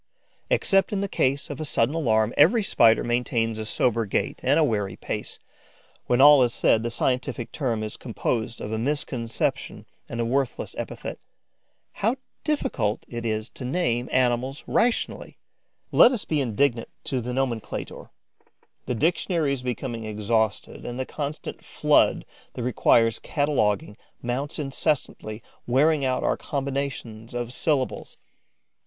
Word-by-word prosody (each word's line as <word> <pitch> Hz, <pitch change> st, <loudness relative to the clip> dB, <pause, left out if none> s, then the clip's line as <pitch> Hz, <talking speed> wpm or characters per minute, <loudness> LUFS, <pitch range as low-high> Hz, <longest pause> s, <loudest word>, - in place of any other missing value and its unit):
Except 195 Hz, -, +3 dB
in 200 Hz, -2 st, -1 dB
the 200 Hz, -, -1 dB
case 140 Hz, -5 st, 0 dB
of 145 Hz, +2 st, -6 dB
a -, -, -1 dB
sudden 135 Hz, -3 st, +1 dB
alarm, 115 Hz, -8 st, +2 dB
every 205 Hz, +10 st, +5 dB
Spider 115 Hz, -, +4 dB
maintains 120 Hz, -2 st, 0 dB
a 110 Hz, -, -3 dB
sober 115 Hz, 0 st, +1 dB
gait -, -, -1 dB
and -, -, +3 dB
a -, -, +5 dB
wary 105 Hz, -4 st, 0 dB
pace. -, -, -5 dB, 0.7 s
When 120 Hz, -, +2 dB
all 145 Hz, 0 st, +9 dB
is 120 Hz, -2 st, +2 dB
said, 110 Hz, -, +3 dB
the 120 Hz, -, -2 dB
scientific 125 Hz, -1 st, -1 dB
term 120 Hz, -7 st, -1 dB
is 110 Hz, -, -5 dB
composed 115 Hz, -1 st, -3 dB
of 105 Hz, -, -5 dB
a 110 Hz, -, -1 dB
misconception 120 Hz, -3 st, -2 dB, 0.2 s
and 120 Hz, -, -5 dB
a 115 Hz, -, +1 dB
worthless 135 Hz, +2 st, -1 dB
epithet. -, -, -6 dB, 0.7 s
How 225 Hz, +5 st, 0 dB, 0.3 s
difficult 245 Hz, -, -1 dB
it 120 Hz, -1 st, -4 dB
is 110 Hz, 0 st, -1 dB
to -, -, -8 dB
name 125 Hz, -3 st, 0 dB
animals 130 Hz, +2 st, +1 dB
rationally! 235 Hz, 0 st, 0 dB, 0.5 s
Let -, -, +7 dB
us 245 Hz, -6 st, -2 dB
be 155 Hz, -3 st, 0 dB
indulgent 120 Hz, 0 st, +1 dB, 0.2 s
to 130 Hz, -2 st, -2 dB
the 125 Hz, +2 st, -4 dB
nomenclator: 125 Hz, -3 st, -3 dB, 0.8 s
the 125 Hz, -, -1 dB
dictionary 160 Hz, -, +1 dB
is 135 Hz, -, -4 dB
becoming 120 Hz, -2 st, -4 dB
exhausted 110 Hz, 0 st, -1 dB
and 120 Hz, +1 st, -5 dB
the 130 Hz, -, -1 dB
constant 150 Hz, +2 st, -5 dB
flood -, -, +2 dB, 0.3 s
that 125 Hz, -, -5 dB
requires 115 Hz, -2 st, +3 dB
cataloguing 110 Hz, -9 st, 0 dB, 0.2 s
mounts 125 Hz, +4 st, -3 dB
incessantly, 135 Hz, -6 st, -2 dB, 0.2 s
wearing 145 Hz, +4 st, +3 dB
out 130 Hz, -1 st, 0 dB
our -, -, +1 dB
combinations 135 Hz, -5 st, -4 dB
of 120 Hz, 0 st, -3 dB
syllables. 140 Hz, -4 st, -1 dB
125 Hz, 145 wpm, -25 LUFS, 115-145 Hz, 0.8 s, all